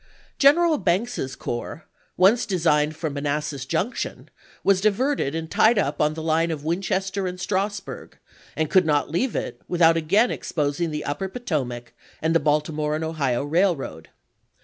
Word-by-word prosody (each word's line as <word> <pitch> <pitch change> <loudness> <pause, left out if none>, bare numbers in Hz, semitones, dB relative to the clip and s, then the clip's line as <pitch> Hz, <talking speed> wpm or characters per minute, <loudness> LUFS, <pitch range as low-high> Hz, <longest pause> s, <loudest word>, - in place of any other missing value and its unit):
General 310 +3 +5
Banks's 185 - -1
corps, 120 +6 -5 0.3
once 200 +7 +4
designed 155 -5 +2
for 160 +1 -3
Manassas 145 -1 -3
Junction, 230 +7 -3 0.3
was 195 -1 +3
diverted 215 - +1
and 165 0 -3
tied 225 +1 +4
up 145 -8 0
on 150 0 +2
the 160 - -5
line 165 +1 +1
of 155 -3 -4
Winchester 190 +3 -1
and 180 0 -5
Stras 195 +2 -2
burg, - - -9 0.4
and 160 0 0
could 185 -2 +4
not 145 -1 +1
leave 235 +9 0
it - - -4
without 165 -2 +4
again 200 +9 +3
exposing 150 +2 -2
the 150 -1 -4
upper 150 +7 -3
Potomac 135 - -4 0.3
and 160 +1 0
the 165 - +4
Baltimore 150 0 0
and 155 - -3
Ohio 140 -6 -1
Railroad. 145 - 0
165 Hz, 155 wpm, -24 LUFS, 150-195 Hz, 0.4 s, General